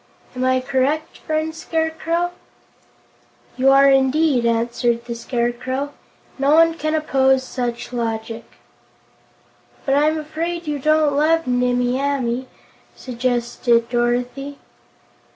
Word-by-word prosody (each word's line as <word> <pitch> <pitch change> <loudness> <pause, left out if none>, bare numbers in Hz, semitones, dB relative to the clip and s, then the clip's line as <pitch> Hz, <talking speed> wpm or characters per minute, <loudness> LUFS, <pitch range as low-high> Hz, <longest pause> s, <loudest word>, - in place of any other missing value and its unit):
Am 255 - -2
I 255 0 +3
correct, 275 +4 -1
friend 315 0 -2
Scarecrow?" 325 +2 -1 1.2
"You 265 +1 +3
are, 275 0 +6
indeed," 270 -1 +3
answered 235 0 0
the 235 - -4
Scarecrow. 245 +3 -2 0.5
"No 280 +2 +4
one 330 0 +5
can 310 -1 -2
oppose 265 -3 +2
such 245 -2 -4
logic." 225 -1 -3 1.4
"But 270 - +1
I'm 300 +3 +3
afraid 330 +3 -4
you 295 -2 -2
don't 305 0 +2
love 325 +3 +2
Nimmie 245 0 +1
Amee," 260 -3 -1 0.5
suggested 240 -1 0
Dorothy. 245 +4 -1
265 Hz, 105 wpm, -20 LUFS, 245-310 Hz, 1.4 s, are